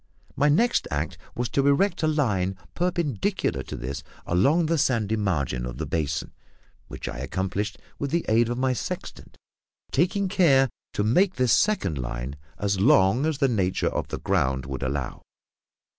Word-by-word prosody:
My 145 Hz, +2 st, +3 dB
next 230 Hz, +11 st, +3 dB
act 75 Hz, +1 st, -3 dB, 0.2 s
was 120 Hz, 0 st, -1 dB
to 140 Hz, 0 st, +1 dB
erect 165 Hz, +9 st, +2 dB
a 155 Hz, -, +2 dB
line 105 Hz, -12 st, 0 dB, 0.2 s
perpendicular 165 Hz, -, -1 dB
to -, -, -7 dB
this 70 Hz, +4 st, -5 dB, 0.2 s
along 140 Hz, -, +3 dB
the 165 Hz, 0 st, +1 dB
sandy 115 Hz, -7 st, +1 dB
margin 75 Hz, -, -1 dB
of -, -, -5 dB
the -, -, -3 dB
basin, 75 Hz, -3 st, -2 dB, 0.5 s
which -, -, -7 dB
I -, -, -5 dB
accomplished 100 Hz, +2 st, -2 dB, 0.2 s
with 140 Hz, -, -2 dB
the 170 Hz, +3 st, 0 dB
aid 115 Hz, +1 st, +3 dB
of 120 Hz, -, -2 dB
my 130 Hz, 0 st, +1 dB
sextant, 120 Hz, -, -6 dB, 0.5 s
taking 190 Hz, +6 st, +1 dB
care 145 Hz, -9 st, +4 dB, 0.2 s
to 105 Hz, -, 0 dB
make 180 Hz, -, +3 dB
this 125 Hz, -3 st, +3 dB
second 95 Hz, -, +2 dB
line 60 Hz, +2 st, -4 dB, 0.2 s
as 100 Hz, -1 st, 0 dB
long 95 Hz, +8 st, +4 dB
as 160 Hz, -3 st, -1 dB
the 140 Hz, -2 st, +3 dB
nature 95 Hz, -7 st, +1 dB
of -, -, -3 dB
the -, -, -4 dB
ground 65 Hz, 0 st, 0 dB
would 65 Hz, -2 st, -5 dB
allow. 70 Hz, -1 st, -3 dB
110 Hz, 165 wpm, -25 LUFS, -, 0.5 s, care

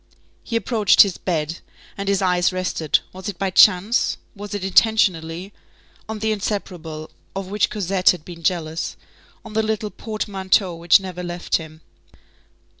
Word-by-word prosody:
He 230 Hz, -, -5 dB
approached 220 Hz, -2 st, +4 dB
his 195 Hz, -4 st, -4 dB
bed, 165 Hz, -2 st, -2 dB, 0.4 s
and 200 Hz, 0 st, -3 dB
his 200 Hz, -1 st, +1 dB
eyes 180 Hz, -1 st, +2 dB
rested, 185 Hz, -4 st, 0 dB
was 190 Hz, +3 st, -6 dB
it 195 Hz, -, -6 dB
by 195 Hz, -1 st, -1 dB
chance? 205 Hz, +4 st, +4 dB, 0.2 s
was 205 Hz, 0 st, -6 dB
it 200 Hz, -, -4 dB
intentionally? 190 Hz, -3 st, +2 dB, 0.6 s
on 220 Hz, -, -3 dB
the 220 Hz, +1 st, -1 dB
inseparable 175 Hz, -7 st, -4 dB, 0.2 s
of 195 Hz, -1 st, -5 dB
which 210 Hz, 0 st, +2 dB
Cosette 195 Hz, -2 st, +1 dB
had 175 Hz, -4 st, +1 dB
been 170 Hz, -2 st, -10 dB
jealous, 165 Hz, -1 st, -2 dB, 0.5 s
on 220 Hz, -, -9 dB
the 220 Hz, -, +2 dB
little 215 Hz, -1 st, -2 dB
portmanteau 195 Hz, -4 st, -1 dB
which 170 Hz, +2 st, +5 dB
never 185 Hz, -2 st, -7 dB
left 175 Hz, 0 st, -1 dB
him. 160 Hz, -1 st, -11 dB
190 Hz, 150 wpm, -21 LUFS, 175-205 Hz, 0.6 s, which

